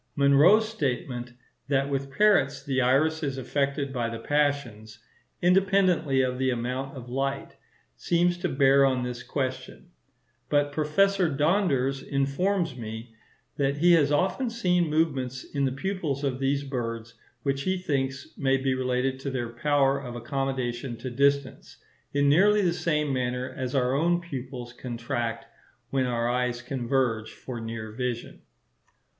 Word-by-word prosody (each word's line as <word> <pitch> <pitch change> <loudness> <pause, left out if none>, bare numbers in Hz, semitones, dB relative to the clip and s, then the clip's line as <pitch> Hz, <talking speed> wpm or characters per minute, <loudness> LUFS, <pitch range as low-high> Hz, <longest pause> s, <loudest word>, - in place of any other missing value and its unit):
Munro's 150 +10 +5
statement, 125 - -3 0.3
that 140 -1 +1
with 140 -1 -2
parrots 145 -5 +3
the 135 -2 0
iris 150 +6 +2
is 140 -3 -2
affected 140 +1 -1
by 120 -3 -1
the 115 - -5
passions, 125 -5 -1 0.5
independently 180 -7 +3
of 125 0 -2
the 130 0 +1
amount 130 +3 -3
of 125 -1 -9
light, 135 +2 -3 0.4
seems 175 - +1
to 180 - -1
bear 140 0 +4
on 130 -2 +2
this 125 -1 -4
question; 130 +7 -5 0.6
but 145 -1 +2
Professor 180 +5 +2
Donders 140 -4 +1
informs 150 +4 0
me, 115 0 -7 0.4
that 140 0 0
he 175 +4 +5
has 150 -4 +4
often 190 - +1
seen 180 -7 +1
movements 135 -5 0
in 140 -1 -2
the 130 - 0
pupils 150 -2 -3
of 135 -2 -1
these 140 +1 0
birds 115 -4 -4 0.3
which 140 -1 0
he 185 +5 0
thinks 135 -6 -3
may 135 -1 +2
be 135 0 0
related 130 +1 -1
to 140 - -4
their 125 -3 -3
power 140 +2 +2
of 125 -3 -7
accommodation 125 -1 -3
to 125 +2 -6
distance, 140 +1 0 0.3
in 145 0 +2
nearly 200 +8 +5
the 175 -2 +2
same 150 -4 0
manner 125 0 -2
as 130 0 -3
our 125 -1 +2
own 170 +5 +2
pupils 130 -7 -7
contract 120 -1 -4 0.5
when 130 -2 +1
our 120 -1 0
eyes 125 0 -1
converge 120 -4 -1
for 120 -3 -7
near 115 -1 -6
vision. 120 +1 -4
135 Hz, 145 wpm, -27 LUFS, 125-150 Hz, 0.6 s, Munro's